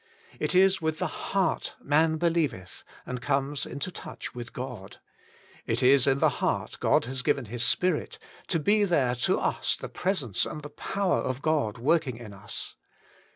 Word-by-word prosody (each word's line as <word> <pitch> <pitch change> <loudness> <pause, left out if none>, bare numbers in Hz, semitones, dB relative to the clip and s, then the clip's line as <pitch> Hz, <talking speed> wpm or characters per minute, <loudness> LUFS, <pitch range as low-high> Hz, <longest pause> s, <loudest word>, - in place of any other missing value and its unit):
It - - 0
is 190 0 +5
with 160 -1 -1
the 175 -2 -4
heart 190 -4 0
man 155 +2 +2
believeth, 155 - -1 0.2
and 125 -1 -5
comes 140 +2 -1
into 140 +8 -4
touch - - -8
with 120 -1 -7
God. 125 -7 -7 0.7
It - - 0
is 135 +1 +6
in 135 0 +4
the - - +2
heart - - -1
God - - +3
has 130 +1 -2
given 130 0 +1
His 120 +3 -3
Spirit, 170 +7 +1 0.3
to 170 - +1
be 205 +7 +3
there 145 -10 +2
to 120 - +2
us - - 0
the - - -7
presence 160 - -1
and 150 - -5
the 145 - -7
power 195 +5 0
of 130 +2 -3
God 145 -9 +1
working 140 0 +1
in 115 -4 -9
us. 100 +2 -7
140 Hz, 170 wpm, -28 LUFS, 125-170 Hz, 0.7 s, is